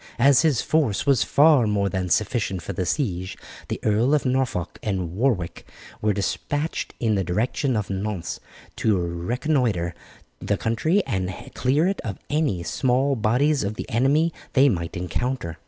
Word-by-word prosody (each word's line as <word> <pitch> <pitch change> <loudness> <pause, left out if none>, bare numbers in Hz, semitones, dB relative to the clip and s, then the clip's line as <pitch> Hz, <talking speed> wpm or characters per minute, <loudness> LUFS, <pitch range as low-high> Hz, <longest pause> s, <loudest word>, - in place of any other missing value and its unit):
As 130 0 +5
his 150 -7 +2
force 145 -11 +1
was 140 -5 +4
far 145 -5 +5
more 100 -1 +1
than 95 -2 -2
sufficient 105 -4 0
for 100 - -5
the 90 -1 -2
siege, 95 - -2 0.3
the - - -3
Earls 115 +7 +3
of 150 - 0
Norfolk 125 -9 -1
and 95 -6 -2
Warwick 100 -4 -1 0.4
were 105 - +2
despatched 145 +10 -2
in 115 -3 +1
the 95 -2 +1
direction 115 - 0
of 100 -2 -3
Nantes 95 -2 -3 0.4
to 110 -3 +2
reconnoitre 90 - -1 0.5
the - - -1
country 160 - +1
and 95 -7 -2 0.2
clear 140 +6 +2
it 195 - -1
of 100 -5 -5
any 145 - 0
small 130 +7 +1
bodies 130 +6 +2
of 100 +2 -3
the - - -6
enemy 145 +8 +2 0.2
they 140 0 +5
might 85 -3 -3
encounter. 90 -1 -3
110 Hz, 155 wpm, -24 LUFS, 95-135 Hz, 0.5 s, As